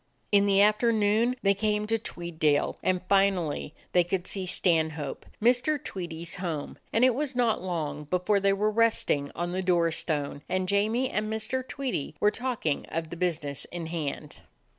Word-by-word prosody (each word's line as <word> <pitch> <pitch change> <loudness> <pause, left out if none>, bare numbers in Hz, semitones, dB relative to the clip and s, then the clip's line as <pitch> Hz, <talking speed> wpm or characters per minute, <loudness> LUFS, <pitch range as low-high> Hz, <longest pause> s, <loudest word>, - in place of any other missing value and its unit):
In 200 -1 +5
the 200 0 +5
afternoon 215 +2 +3
they 200 0 +5
came 210 +1 0
to 225 +1 0
Tweeddale; 160 -7 -1
and 185 -1 0
finally 190 -7 +1 0.2
they 180 - +4
could 175 +1 -2
see 190 -2 -3
Stanhope, 160 -5 0
Mr. 245 +6 +3
Tweedie's 170 - -5
home, 165 -6 -4
and 230 +3 +4
it 255 - +4
was 280 +1 -2
not 240 -3 +2
long 155 -5 -3
before 180 +6 +1
they 195 0 +3
were 210 +2 +1
resting 215 -10 +1
on 175 0 -2
the 185 +1 -1
door 175 -2 +2
stone, 145 -3 -2
and 185 0 0
Jamie 215 +6 +1
and 215 +1 -1
Mr. 220 +4 -1
Tweedie 245 - -3
were 210 - +4
talking 240 - -2
of 165 -1 -4
the - - -4
business 160 -5 -2
in 175 -2 -6
hand. 155 -2 -4
185 Hz, 165 wpm, -28 LUFS, 165-215 Hz, 0.2 s, In